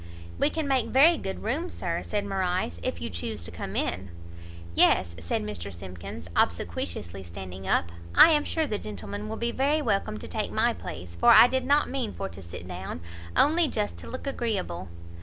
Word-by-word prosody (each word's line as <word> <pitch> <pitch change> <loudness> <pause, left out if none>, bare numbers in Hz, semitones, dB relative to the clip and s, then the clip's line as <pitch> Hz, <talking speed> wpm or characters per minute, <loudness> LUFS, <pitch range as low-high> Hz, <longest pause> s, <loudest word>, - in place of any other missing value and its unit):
"We - - +4
can 320 -3 -2
make 265 -4 +2
very 305 +6 +6
good 190 0 -5
room, 300 +11 -1
Sir," 170 -1 -3
said 205 -1 -2
Morrice, 185 - -1
"if 85 - -2
you 80 - -4
chuse 85 +3 -4
to 85 - -7
come 85 - -6
in." 95 +1 -1 0.6
"Yes," 85 0 +4
said 85 +5 -2
Mr 100 -2 -5
Simkins, 90 -1 -8
obsequiously 85 +1 -1
standing 95 +1 -8
up, 85 - +2 0.2
"I 330 - +9
am 300 -2 +4
sure 320 +1 0
the 210 -7 -2
gentleman 100 +1 -6
will - - -4
be 235 0 0
very 280 +5 +2
welcome 200 - 0
to - - -8
take - - -2
my - - +2
place, 85 0 -8
for 85 - +4
I - - +10
did 260 +1 0
not 290 +1 +4
mean 255 -6 -3
for 195 - -4
to 95 - -11
sit 85 0 -9
down, 90 -2 -6 0.3
only 320 +3 +5
just 210 -6 -2
to - - -9
look 255 - -6
agreeable." 205 - -2
105 Hz, 195 wpm, -27 LUFS, -, 0.6 s, I